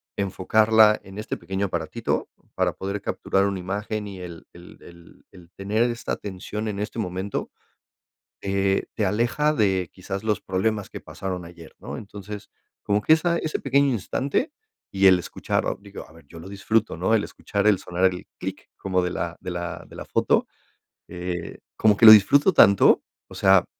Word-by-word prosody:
enfocarla 105 +3 +3
en 95 +1 -10
este 110 - -4
pequeño 95 +1 -3
aparatito, - - -3 0.3
para - - +1
poder 100 +2 -4
capturar 95 0 0
una 100 -1 -2
imagen 105 +3 -4
y 100 -2 -9
el 85 -2 -10
el 85 0 -15
el 85 -1 -17
el 90 -2 -16
tener 105 +4 -1
esta 120 - -4
atención 105 +2 -5
en 100 -2 -4
este 105 +3 -5
momento, 95 -1 -3 0.9
eh, 95 0 0
te 105 - -1
aleja 120 +9 +1
de 95 - +1
quizás 95 +2 -6
los 105 -2 0
problemas 100 +2 -1
que - - -7
pasaron 95 -2 -6
ayer, 85 -1 -13
¿no? - - -7
Entonces, 105 0 -9 0.3
como 105 0 +1
que 155 - +5
esa, 170 +1 +2
ese 155 - -3
pequeño 140 +1 +2
instante, 135 - -1 0.4
y 95 0 +4
el 95 -1 +7
escuchar, 90 - -2 0.2
digo 100 0 -10
a - - -19
ver, 80 -1 -18
yo 80 - -12
lo 80 - -10
disfruto, 100 0 0
¿no?, 95 +6 +2
el 105 - +1
escuchar 100 -1 -3
el 100 -3 +4
sonar 90 +1 -1
el 90 - -8
"clic" - - -7
como 95 -1 0
de 90 0 -2
la 85 0 -4
de 90 - -6
la 85 0 -5
de - - -14
la - - -8
foto, - - +1 0.6
eh, 90 0 -5 0.2
como 105 -2 +3
que 115 - +5
lo 110 - +14
disfruto 140 - +5
tanto. 100 - +6 0.2
O - - -13
sea, 95 -2 +4
100 Hz, 180 wpm, -24 LUFS, 90-110 Hz, 0.9 s, lo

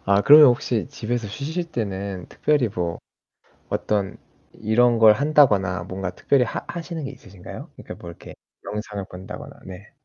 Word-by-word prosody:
아 100 +1 +3
그러면 150 +3 +9
혹시 120 -1 0
집에서 120 -5 -4
쉬실 160 - -4
때는 100 - -4
특별히 145 -6 +1
뭐 85 -4 -3 0.7
어떤 100 -2 -1 0.4
이런 115 +2 +2
걸 110 -1 +8
한다거나 105 - +3
뭔가 95 0 -5
특별히 130 +8 +2
하 - - -5
하시는 170 -2 -6
게 135 - -5
있으신가요? 100 -8 -11
그니까 - - -10
뭐 85 - -10
이렇게 85 - -12 0.3
영상을 105 -2 -5
본다거나. 90 +1 -10
네. 95 +3 -11
105 Hz, 335 characters per minute, -23 LUFS, 95-135 Hz, 0.7 s, 그러면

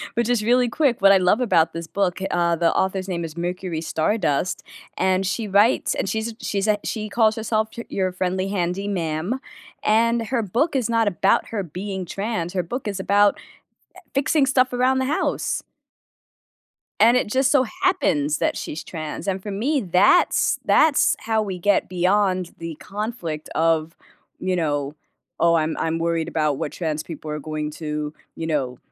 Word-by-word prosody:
but 235 +1 +1
just 240 -1 +1
really 245 +2 +3
quick, 265 -4 +1
what 195 0 +7
I 195 - +7
love 185 +6 +2
about 165 -9 +3
this 165 0 -6
book, 190 0 -1
uh, 170 -1 +2
the 165 0 +2
author's 190 0 0
name 170 -2 -2
is 160 0 -9
Mercury 175 -1 -3
Stardust, 165 -1 0 0.3
and 190 0 +1
she 215 +4 -2
writes 205 +4 +3
and - - -2
she's 220 +3 -2
a - - -14
she's 200 0 -1
a 210 -1 +3
she 215 -2 -3
calls 220 0 +3
herself 220 -1 -1
y 235 - -4
"your 185 -1 -1
friendly 185 +1 -1
handy 190 0 -2
ma'am," 175 +4 -2 0.4
and 230 +1 +2
her 250 -1 0
book 235 - 0
is 250 -4 0
not 230 -1 +2
about 180 - +2
her 215 -3 -3
being 190 +3 -5
trans, 195 -1 -3
her 180 -2 0
book 240 +8 -5
is 200 -2 -3
about, 205 +1 +3 0.6
e - - -11
fixing 280 +1 +2
stuff 255 -1 +2
around 255 +1 +2
the 260 - 0
house 295 +4 -1 1.4
and 235 +3 +6
it 250 - +1
just 260 +4 +2
so 275 -3 +4 0.2
happens 155 - +2
that - - 0
she's 155 - -5
trans, 155 +3 -6
and 190 0 -1
for 205 - -5
me, 270 +9 0
that's 180 -4 +3
that's 305 -2 +4
how 220 -1 0
we 195 -3 -4
get 205 +3 +2
beyond 185 0 +1
the 165 -1 -6
conflict 195 -7 -5
of, 165 0 +1 0.4
you 185 0 0
know, 145 -4 -1 0.5
"Oh, 170 0 +4
I'm 160 -1 +1
I'm 165 0 -1
worried 165 -1 0
about 155 -3 0
what - - -3
trans 155 -3 -3
people 155 -2 -7
are 150 - -3
going 150 0 -4
to, 150 -1 -4 0.2
you 165 - -4
know, 130 -5 -1
190 Hz, 180 wpm, -22 LUFS, 165-225 Hz, 1.4 s, what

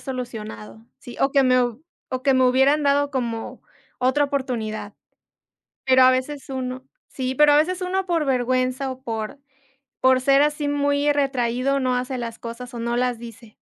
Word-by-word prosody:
solucionado, 210 - -7
sí, 245 - -11
o 270 - +3
que 275 -1 +4
me 255 -1 +4
hub 245 +5 -4 0.3
o 255 -1 -3
que 270 -1 +4
me 260 - +4
hubieran 270 +4 +3
dado 285 0 +2
como 235 -3 -4 0.4
otra 260 +3 +2
oportunidad. 235 -7 -3 0.9
Pero 260 0 +6
a 255 - +7
veces 270 +2 -3
uno 260 0 -4 0.2
Sí, 260 -1 -3
pero 300 -1 +6
a - - +5
veces 365 +4 0
uno, 375 +1 -1
por 335 -3 0
vergüenza 255 +1 0
o 260 - -8
por 225 +1 -5 0.6
por 260 0 +4
ser 275 +1 +4
así 295 0 0
muy 285 0 +1
retraído, 270 -1 0
no 255 -1 0
hace 255 +1 -3
las 230 -1 -5
cosas 240 +2 -8
o - - -5
no 235 +1 -1
las 245 -1 0
dice. 230 -1 -12
255 Hz, 175 wpm, -23 LUFS, 245-280 Hz, 0.9 s, a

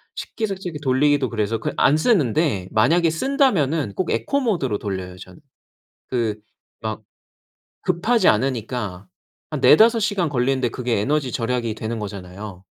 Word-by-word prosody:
식기세척기 190 -7 -4
돌리기도 140 0 +2
그래서 110 0 -1
그 - - -3
안 145 - +4
쓰는데 155 - +1
만약에 165 +10 +3
쓴다면은 165 - +1
꼭 185 - -2
에코 280 - 0
모드로 165 - 0
돌려요 95 -3 -5
저는. 90 -1 -13 0.7
그 110 -4 -1 0.4
막 110 -1 -4 0.8
급하지 190 +4 +2
않으니까 110 -5 -2 0.4
한 - - -3
4-5 225 +8 +6
시간 205 -5 0
걸리는데 130 -1 0
그게 120 0 -2
에너지 135 +3 0
절약이 115 -1 -1
되는 115 +1 -4
거잖아요. 95 -1 -8
130 Hz, 305 characters per minute, -22 LUFS, 110-170 Hz, 0.8 s, 4-5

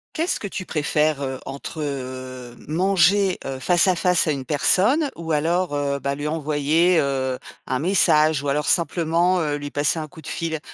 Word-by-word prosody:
Qu'est-ce 330 +2 -1
que 205 - -5
tu 185 -1 -6
préfères, 150 -1 0
heu, 130 -1 -4
entre, 140 +3 -6
heu, 130 -3 -6
manger, 190 +3 +2
heu, 135 -1 -4
face 175 +7 +2
à 185 - +3
face 180 -1 +2
à - - +2
une 135 -3 -4
personne 210 - +2
ou 165 -1 -6
alors, 165 +3 0
heu, 140 -1 -1
bah, 140 0 -2
lui 145 +1 -4
envoyer, 155 +3 +2
heu, 130 -2 -1 0.3
un 130 - -2
message 155 -3 +3
ou - - -3
alors 150 +2 0
simplement, 170 +1 +2
heu, 150 -2 -1
lui 145 0 -7
passer 145 +3 0
un 155 -1 -4
coup 160 +1 -14
de - - -12
fil? 160 -2 -3
155 Hz, 190 wpm, -22 LUFS, 140-175 Hz, 0.3 s, à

